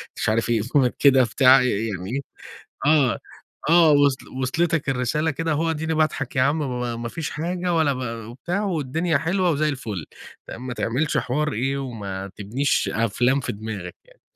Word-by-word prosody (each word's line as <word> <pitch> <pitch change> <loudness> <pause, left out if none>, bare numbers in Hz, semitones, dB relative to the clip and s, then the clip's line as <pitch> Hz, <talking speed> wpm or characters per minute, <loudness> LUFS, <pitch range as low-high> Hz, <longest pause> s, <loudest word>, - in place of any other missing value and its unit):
مش - - -1
عارف 115 +1 +1
إيه 115 -3 +2
Comic 125 +2 +2
كده 135 -2 +6
بتاع 130 +3 +5
ي 125 - +2 0.2
يعني 105 +8 -4 0.6
آه، 145 -5 +3 0.5
آه 165 -2 +6
وصل 145 -2 +3
وصلتك 160 +2 0
الرسالة 135 +5 0
كده، 165 +3 -2
أهو 165 +2 +1
اديني 160 0 -1
باضحك 155 -4 0
يا 130 - +3
عم 145 +4 +2
ب - - -1
ما 125 -1 -3
ما 120 0 -5
فيش 160 +3 -4
حاجة 175 +3 -2
ولا 155 -4 +2
ب 115 -3 -5
وبتاع 175 - -3
والدنيا 165 -2 0
حلوة 180 +4 0
وزي 155 +1 +1
الفل، 110 - -5 0.4
تمام 130 +2 -8
ما 125 - -3
تعملش 130 +7 -1
حوار 150 +4 -1
إيه 135 +5 -1
وما 100 -7 -5
تبنيش 120 +8 0
أفلام 120 +4 +1
في 125 - -3
دماغك 100 -4 -6
يعني - - -24
135 Hz, 175 wpm, -23 LUFS, 120-155 Hz, 0.6 s, كده